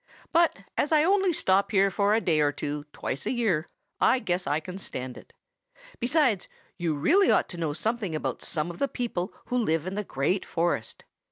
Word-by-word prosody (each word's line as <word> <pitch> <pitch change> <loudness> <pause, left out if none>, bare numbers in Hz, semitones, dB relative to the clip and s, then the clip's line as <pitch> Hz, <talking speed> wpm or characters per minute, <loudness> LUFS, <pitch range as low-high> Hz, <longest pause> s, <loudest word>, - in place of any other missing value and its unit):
But 335 0 +4 0.2
as 295 - +1
I 305 -1 +5
only 385 +1 +3
stop 195 - +2
here 195 -1 +3
for 200 +3 +2
a - - +3
day 160 -6 +2
or 145 -1 +3
two 145 +1 -4
twice 140 - -4
a - - +1
year, 205 -11 0 0.3
I - - +4
guess 180 -7 -2
I 150 - +1
can 180 +4 -8
stand 130 -8 -5
it. - - -14 0.7
Besides, 255 - +2 0.3
you 170 -4 -1
really 370 - +4
ought - - +3
to 175 - -8
know 160 -3 -1
something 210 +1 -2
about 155 - -3
some 160 +1 -2
of 170 - -12
the 280 - +2
people 225 -9 -3
who 250 - -1
live 165 -8 +1
in 185 - -3
the 210 +1 -2
Great 180 +3 0
Forest. 165 -10 -2
185 Hz, 200 wpm, -27 LUFS, 155-240 Hz, 0.7 s, I